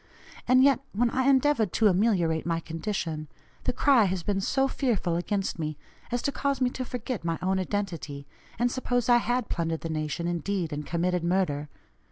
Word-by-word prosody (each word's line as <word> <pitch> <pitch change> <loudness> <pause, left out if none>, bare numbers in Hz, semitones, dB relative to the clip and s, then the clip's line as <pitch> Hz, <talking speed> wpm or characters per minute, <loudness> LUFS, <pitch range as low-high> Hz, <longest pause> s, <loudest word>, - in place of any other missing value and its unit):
And 255 +1 +6
yet, 275 -1 +5
when 235 +3 +2
I 260 0 +1
endeavored 270 - +3
to 225 - +2
ameliorate 180 -5 +2
my 165 -1 0
condition, 165 -2 -4 0.4
the - - +2
cry 265 -7 +4
has 185 -2 -1
been 195 0 0
so 270 +7 +2
fearful 230 -11 0
against 190 +1 -2
me 155 -2 -3 0.3
as 245 0 -1
to 280 - +1
cause 280 -1 -1
me 250 -1 +2
to 255 - -4
forget 250 -4 -4
my 165 -1 -1
own 190 +1 0
identity, 165 -8 -3 0.3
and 240 +1 +1
suppose 245 -2 -1
I 240 - +7
had 245 0 0
plundered 165 -2 -2
the 165 - -4
nation, 155 +2 -2
indeed, 175 -1 -2
and 145 0 -5
committed 175 +1 0
murder. 170 -5 0
190 Hz, 185 wpm, -27 LUFS, 165-245 Hz, 0.4 s, I